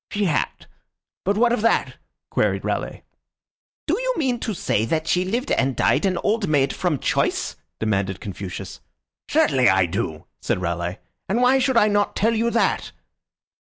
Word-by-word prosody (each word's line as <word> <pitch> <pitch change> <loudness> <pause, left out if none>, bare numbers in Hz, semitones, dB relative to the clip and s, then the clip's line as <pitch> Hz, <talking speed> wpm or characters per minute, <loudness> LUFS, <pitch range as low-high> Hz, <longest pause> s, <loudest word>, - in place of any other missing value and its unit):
"She 205 0 -1
had; 160 -5 -1 0.6
but 200 +2 +1
what 235 +1 +4
of 240 - 0
that?" 230 - +1 0.3
queried - - 0
Raleigh. - - -3 0.8
"Do - - 0
you - - 0
mean 255 -6 0
to 220 -3 -3
say 110 - 0
that 155 +6 -1
she 180 - +2
lived 235 +9 -2
and 135 -1 +1
died 150 +7 +2
an 185 -2 0
old 215 -1 +1
maid 140 -3 +2
from 175 -5 0
choice?" - - 0 0.2
demanded 100 -3 -1
Confucius. 95 -2 -7 0.5
"Certainly 130 -4 +4
I 95 0 +4
do," 85 -4 -3 0.2
said - - -1
Raleigh. 85 +1 -2 0.3
"And 215 +5 +1
why 250 +2 +4
should 260 -1 +2
I 210 - +5
not 205 -1 +1
tell 225 +3 +2
you 230 +1 +1
that?" 230 0 0
185 Hz, 165 wpm, -22 LUFS, -, 0.8 s, I